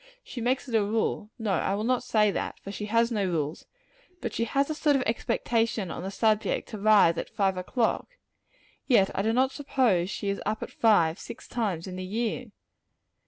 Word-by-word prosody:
She 245 Hz, -, -7 dB
makes 255 Hz, +4 st, 0 dB
it 245 Hz, -, -7 dB
a 220 Hz, -2 st, +4 dB
rule 210 Hz, 0 st, -1 dB
no, 220 Hz, -4 st, -2 dB
I 190 Hz, +2 st, +1 dB
will 210 Hz, -, -2 dB
not 250 Hz, +2 st, +1 dB
say 215 Hz, -4 st, +3 dB
that, -, -, -4 dB
for 195 Hz, -, -8 dB
she 210 Hz, +1 st, -5 dB
has 230 Hz, +2 st, +2 dB
no 210 Hz, -3 st, 0 dB
rules, 160 Hz, -5 st, -2 dB, 0.5 s
but 235 Hz, -, -4 dB
she 230 Hz, -, 0 dB
has 275 Hz, +4 st, +1 dB
a 310 Hz, -, -2 dB
sort 300 Hz, -1 st, +2 dB
of 265 Hz, -, +1 dB
expectation 225 Hz, -3 st, 0 dB
on -, -, -5 dB
the 190 Hz, -, -4 dB
subject 215 Hz, +1 st, 0 dB
to 215 Hz, -, -6 dB
rise 205 Hz, -5 st, +5 dB
at -, -, -5 dB
five 195 Hz, -2 st, +1 dB
o'clock. 220 Hz, +6 st, -1 dB, 0.8 s
Yet 205 Hz, -7 st, +4 dB
I -, -, 0 dB
do 220 Hz, +2 st, +1 dB
not 260 Hz, +3 st, +2 dB
suppose 245 Hz, -, +1 dB
she 200 Hz, -, -3 dB
is 200 Hz, -, -2 dB
up 215 Hz, +1 st, -2 dB
at -, -, -7 dB
five, 175 Hz, -7 st, +3 dB
six 235 Hz, -, -9 dB
times 200 Hz, -9 st, -2 dB
in 185 Hz, -1 st, -7 dB
the 185 Hz, -, -4 dB
year. 230 Hz, +5 st, -2 dB
215 Hz, 210 wpm, -27 LUFS, 195-235 Hz, 0.8 s, rise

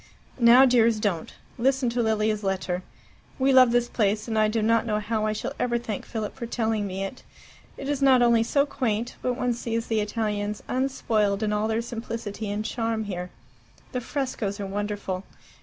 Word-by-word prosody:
"Now, 240 Hz, +2 st, +8 dB
dears, 230 Hz, -3 st, +4 dB
don't. 190 Hz, -6 st, -1 dB, 0.3 s
Listen 265 Hz, +1 st, +2 dB
to 240 Hz, +1 st, 0 dB
Lilia's 215 Hz, -1 st, +1 dB
letter. 190 Hz, -2 st, -1 dB, 0.6 s
'We 270 Hz, 0 st, +3 dB
love 255 Hz, -2 st, +7 dB
this 240 Hz, 0 st, +2 dB
place, 210 Hz, -1 st, 0 dB
and 225 Hz, -, -2 dB
I 215 Hz, 0 st, +4 dB
do 215 Hz, 0 st, 0 dB
not 230 Hz, +1 st, +3 dB
know 215 Hz, -2 st, -1 dB
how 215 Hz, 0 st, -1 dB
I 215 Hz, -, 0 dB
shall 215 Hz, -, -4 dB
ever 240 Hz, -1 st, +1 dB
thank 225 Hz, -4 st, -5 dB
Philip 215 Hz, -2 st, -4 dB
for 240 Hz, -3 st, -5 dB
telling 220 Hz, -3 st, -1 dB
me 190 Hz, 0 st, -4 dB
it. 195 Hz, +6 st, -6 dB, 0.6 s
It 275 Hz, -, -6 dB
is 285 Hz, -1 st, -1 dB
not 260 Hz, -3 st, +6 dB
only 235 Hz, -1 st, +5 dB
so 280 Hz, +5 st, +2 dB
quaint, 235 Hz, -4 st, -2 dB
but 250 Hz, -1 st, -1 dB
one 250 Hz, -2 st, 0 dB
sees 230 Hz, -1 st, -3 dB
the 225 Hz, -1 st, 0 dB
Italians 210 Hz, -1 st, -2 dB
unspoiled 220 Hz, -6 st, 0 dB
in 210 Hz, -1 st, 0 dB
all 210 Hz, +1 st, +1 dB
their 225 Hz, +1 st, 0 dB
simplicity 225 Hz, -3 st, -5 dB
and 210 Hz, +1 st, -2 dB
charm 225 Hz, -1 st, -1 dB
here. 180 Hz, -3 st, -5 dB, 0.6 s
The 250 Hz, -, -2 dB
frescoes 240 Hz, -7 st, -3 dB
are 200 Hz, -, -3 dB
wonderful. 200 Hz, -1 st, -3 dB
225 Hz, 190 wpm, -26 LUFS, 210-240 Hz, 0.6 s, Now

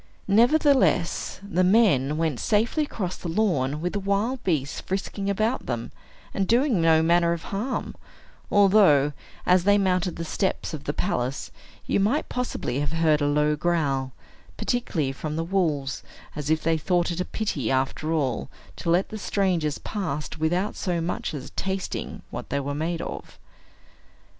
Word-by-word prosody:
Nevertheless, 245 Hz, -, +3 dB
the 185 Hz, -2 st, +1 dB
men 180 Hz, -, +4 dB
went 160 Hz, -6 st, 0 dB
safely 230 Hz, -, +1 dB
across 185 Hz, -9 st, -4 dB
the 175 Hz, -, -6 dB
lawn 155 Hz, -7 st, 0 dB
with 175 Hz, +1 st, -2 dB
the 205 Hz, -, -1 dB
wild 200 Hz, +6 st, -1 dB
beasts 150 Hz, -6 st, -1 dB
frisking 195 Hz, +1 st, -3 dB
about 215 Hz, +6 st, 0 dB
them, 115 Hz, 0 st, -3 dB, 0.4 s
and 195 Hz, -1 st, 0 dB
doing 240 Hz, -, +3 dB
no 160 Hz, -1 st, +5 dB
manner 170 Hz, 0 st, +3 dB
of 170 Hz, -, -5 dB
harm; 210 Hz, +7 st, -3 dB, 0.6 s
although, 190 Hz, -9 st, +5 dB, 0.3 s
as 180 Hz, 0 st, +4 dB
they 205 Hz, +1 st, +5 dB
mounted 185 Hz, -3 st, +1 dB
the 165 Hz, -, -4 dB
steps 190 Hz, +2 st, -2 dB
of 150 Hz, -2 st, -6 dB
the -, -, 0 dB
palace, 135 Hz, -8 st, -2 dB, 0.3 s
you -, -, +1 dB
might 220 Hz, +10 st, +1 dB
possibly 250 Hz, -, -2 dB
have 145 Hz, +1 st, -2 dB
heard 160 Hz, -2 st, +3 dB
a 145 Hz, -, +2 dB
low 150 Hz, +1 st, +2 dB
growl, 145 Hz, -5 st, 0 dB, 0.5 s
particularly 165 Hz, -, -1 dB
from 150 Hz, +3 st, -5 dB
the 165 Hz, -, -1 dB
wolves; 160 Hz, -7 st, -1 dB, 0.3 s
as 150 Hz, -1 st, -4 dB
if 160 Hz, 0 st, +1 dB
they 165 Hz, -1 st, +2 dB
thought 175 Hz, +1 st, +1 dB
it 170 Hz, -, -4 dB
a -, -, -2 dB
pity, 155 Hz, -, -2 dB
after 135 Hz, +4 st, 0 dB
all, 140 Hz, -7 st, -1 dB, 0.3 s
to -, -, -3 dB
let 175 Hz, +3 st, +2 dB
the 215 Hz, -, -6 dB
strangers 180 Hz, -8 st, 0 dB
pass 165 Hz, -8 st, -3 dB
without 175 Hz, +6 st, 0 dB
so 175 Hz, -2 st, -1 dB
much 165 Hz, +2 st, -2 dB
as 140 Hz, -4 st, -7 dB
tasting 190 Hz, -1 st, -4 dB
what -, -, -6 dB
they 140 Hz, -, 0 dB
were 140 Hz, +1 st, -3 dB
made 165 Hz, +3 st, -2 dB
of. -, -, -7 dB
170 Hz, 160 wpm, -25 LUFS, 150-200 Hz, 0.6 s, no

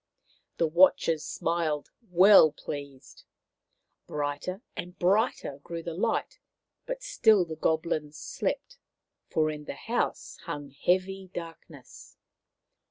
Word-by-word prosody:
The 165 Hz, -, +3 dB
watchers 165 Hz, -1 st, +4 dB
smiled, 160 Hz, -3 st, -2 dB, 0.2 s
well 180 Hz, -2 st, +7 dB
pleased. 140 Hz, -2 st, -8 dB, 0.8 s
Brighter 150 Hz, -, -3 dB
and 180 Hz, +1 st, -7 dB
brighter 195 Hz, -, +1 dB
grew 165 Hz, +3 st, -7 dB
the 170 Hz, -, -4 dB
light, 215 Hz, +7 st, -1 dB, 0.5 s
but -, -, -4 dB
still 215 Hz, -5 st, +4 dB
the 160 Hz, -1 st, -6 dB
Goblins 155 Hz, -1 st, -1 dB
slept, -, -, -4 dB, 0.5 s
for 155 Hz, -1 st, +1 dB
in 150 Hz, -1 st, -8 dB
the -, -, -6 dB
house -, -, -2 dB
hung 145 Hz, -1 st, -6 dB
heavy 185 Hz, +6 st, 0 dB
darkness. 165 Hz, -1 st, -10 dB
165 Hz, 105 wpm, -28 LUFS, 150-185 Hz, 0.8 s, well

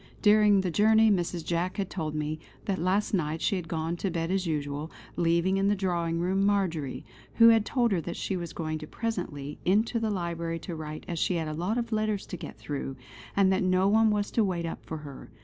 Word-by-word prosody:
During 210 Hz, -2 st, +6 dB
the 185 Hz, -2 st, -1 dB
journey 220 Hz, +3 st, +5 dB
Mrs. 175 Hz, -3 st, -1 dB
Jack 175 Hz, +4 st, -1 dB
had 195 Hz, -2 st, -2 dB
told 155 Hz, -4 st, -3 dB
me 155 Hz, +1 st, -2 dB, 0.3 s
that 195 Hz, -2 st, -1 dB
last 195 Hz, +5 st, +1 dB
night 160 Hz, -4 st, 0 dB
she 200 Hz, -, +1 dB
had 180 Hz, -3 st, -4 dB
gone 165 Hz, 0 st, -2 dB
to 195 Hz, -, -1 dB
bed 165 Hz, 0 st, -2 dB
as 190 Hz, -1 st, 0 dB
usual, 145 Hz, 0 st, -2 dB, 0.3 s
leaving 170 Hz, +3 st, +2 dB
in 195 Hz, +1 st, +2 dB
the 205 Hz, -, +3 dB
drawing 170 Hz, -3 st, -1 dB
room 190 Hz, +3 st, +1 dB
Marjory, 185 Hz, -9 st, 0 dB, 0.3 s
who 230 Hz, 0 st, +8 dB
had 225 Hz, -2 st, +4 dB
told 240 Hz, -4 st, +2 dB
her 180 Hz, -4 st, +1 dB
that -, -, -5 dB
she 195 Hz, -, -2 dB
was 170 Hz, -2 st, -4 dB
going 155 Hz, -1 st, -3 dB
presently 155 Hz, -5 st, -4 dB
into 220 Hz, +5 st, +2 dB
the 225 Hz, -1 st, 0 dB
library 170 Hz, -3 st, -2 dB
to 165 Hz, +1 st, -6 dB
write 155 Hz, -1 st, -7 dB
as 170 Hz, -2 st, -3 dB
she 180 Hz, -, +1 dB
had 165 Hz, -2 st, -1 dB
a -, -, -3 dB
lot 180 Hz, +9 st, -1 dB
of 235 Hz, -1 st, -2 dB
letters 215 Hz, -2 st, 0 dB
to -, -, -6 dB
get -, -, -8 dB
through, 135 Hz, -2 st, -4 dB, 0.4 s
and 190 Hz, -1 st, +4 dB
that 190 Hz, -, +1 dB
no 185 Hz, 0 st, +3 dB
one 220 Hz, +2 st, +5 dB
was 205 Hz, -1 st, 0 dB
to 225 Hz, -, +2 dB
wait 175 Hz, -4 st, -1 dB
up 165 Hz, -, -5 dB
for 160 Hz, -, -5 dB
her. 145 Hz, -3 st, -10 dB
180 Hz, 225 wpm, -28 LUFS, 165-205 Hz, 0.4 s, who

